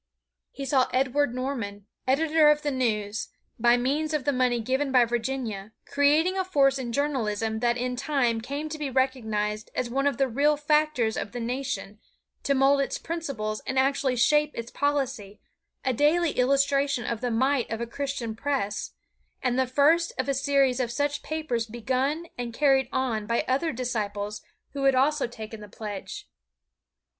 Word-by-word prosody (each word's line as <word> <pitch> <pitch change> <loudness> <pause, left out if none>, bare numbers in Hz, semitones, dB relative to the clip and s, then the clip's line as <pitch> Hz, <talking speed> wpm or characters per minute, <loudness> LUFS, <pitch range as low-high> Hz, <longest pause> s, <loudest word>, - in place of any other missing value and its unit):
He 275 - -6
saw 265 -2 +3
Edward 260 0 +1
Norman, 230 -7 -4 0.2
editor 305 +3 +4
of 300 0 +3
the 290 - 0
NEWS, 220 -5 -1 0.3
by 240 +1 +5
means 300 +5 0
of 290 - -2
the 285 - +2
money 250 -2 +2
given 265 +4 -1
by 250 -2 +5
Virginia, 230 -4 -3
creating 310 +7 +2
a - - +2
force 275 -7 +2
in 240 -2 -4
journalism 225 -6 -1
that 240 +1 +1
in 250 +1 -2
time 250 -4 0
came 280 +6 -4
to 310 0 -6
be 295 -2 -2
recognized 220 -5 -1
as 240 -2 -2
one 275 +2 +1
of 280 -4 0
the 270 - +2
real 285 +5 +2
factors 300 -6 +1
of 205 - -4
the 245 - -4
nation 245 -3 -4 0.4
to 280 - +1
mold 275 +1 +4
its 275 - -2
principles 275 -11 -4
and 260 - -2
actually 270 -1 +2
shape 295 +5 +3
its 235 0 -6
policy, 265 -8 -2 0.5
a 260 - +2
daily 310 +5 +3
illustration 275 0 +2
of 235 -1 -3
the 250 - -1
might 260 +2 +1
of 225 - -3
a 235 - -2
Christian 250 -2 -4
press, 225 -5 -2 0.5
and 250 0 +1
the 260 - +2
first 300 +6 +3
of 260 - -1
a 275 - +1
series 275 -2 +2
of 250 -2 0
such 285 +4 -1
papers 280 -8 -2
begun 260 +8 -1
and 235 -1 -4
carried 270 -3 +3
on 235 -5 -1
by 235 - 0
other 280 +6 +1
disciples 210 -4 -3 0.3
who 275 -1 -2
had 270 -1 +5
also 280 +1 +2
taken 220 -2 -8
the 210 -1 -11
pledge. 205 - -7
260 Hz, 170 wpm, -26 LUFS, 235-285 Hz, 0.5 s, by